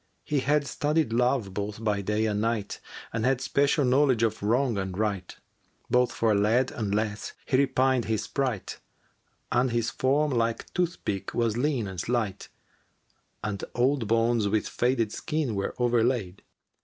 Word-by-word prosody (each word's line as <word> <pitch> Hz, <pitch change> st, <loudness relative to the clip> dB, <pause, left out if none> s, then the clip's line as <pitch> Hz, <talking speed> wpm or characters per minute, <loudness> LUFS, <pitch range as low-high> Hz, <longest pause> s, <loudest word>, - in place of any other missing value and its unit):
He 150 Hz, -2 st, 0 dB
had 145 Hz, +2 st, +2 dB
studied 150 Hz, -3 st, 0 dB
Love 125 Hz, -4 st, +1 dB
both 105 Hz, +2 st, -4 dB
by 105 Hz, -2 st, +1 dB
day 105 Hz, +2 st, 0 dB
and 105 Hz, -1 st, 0 dB
night 115 Hz, -2 st, -1 dB, 0.2 s
* -, -, -13 dB
And 115 Hz, -1 st, -1 dB
had 130 Hz, 0 st, +2 dB
special 140 Hz, +2 st, +2 dB
knowledge 130 Hz, -2 st, +3 dB
of 110 Hz, -1 st, 0 dB
Wrong 120 Hz, +3 st, +1 dB
and 95 Hz, -1 st, -4 dB
Right; 100 Hz, -4 st, -2 dB, 0.6 s
Both 125 Hz, 0 st, +3 dB
for 115 Hz, -2 st, +1 dB
lad 110 Hz, +6 st, +2 dB
and 105 Hz, -3 st, -2 dB
lass 105 Hz, -1 st, -2 dB
had 130 Hz, -, +2 dB
repined 130 Hz, -2 st, +2 dB
his 110 Hz, -2 st, -1 dB
sprite, 130 Hz, -8 st, -3 dB, 0.4 s
* -, -, -44 dB
And 125 Hz, +2 st, +2 dB
his 120 Hz, 0 st, 0 dB
form 145 Hz, +3 st, +1 dB
like 115 Hz, -2 st, -1 dB
toothpick 170 Hz, -, -2 dB
was 115 Hz, -2 st, +1 dB
lean 130 Hz, -2 st, 0 dB
and 95 Hz, -2 st, -6 dB
slight, 110 Hz, -1 st, -2 dB, 0.9 s
And 100 Hz, -2 st, -3 dB
old 125 Hz, -1 st, +2 dB
bones 115 Hz, -1 st, +2 dB
with 105 Hz, +1 st, 0 dB
faded 120 Hz, -3 st, 0 dB
skin 150 Hz, -5 st, -2 dB
were 100 Hz, -1 st, -2 dB
o'erlaid. 120 Hz, -5 st, +1 dB
115 Hz, 160 wpm, -27 LUFS, 105-130 Hz, 0.9 s, knowledge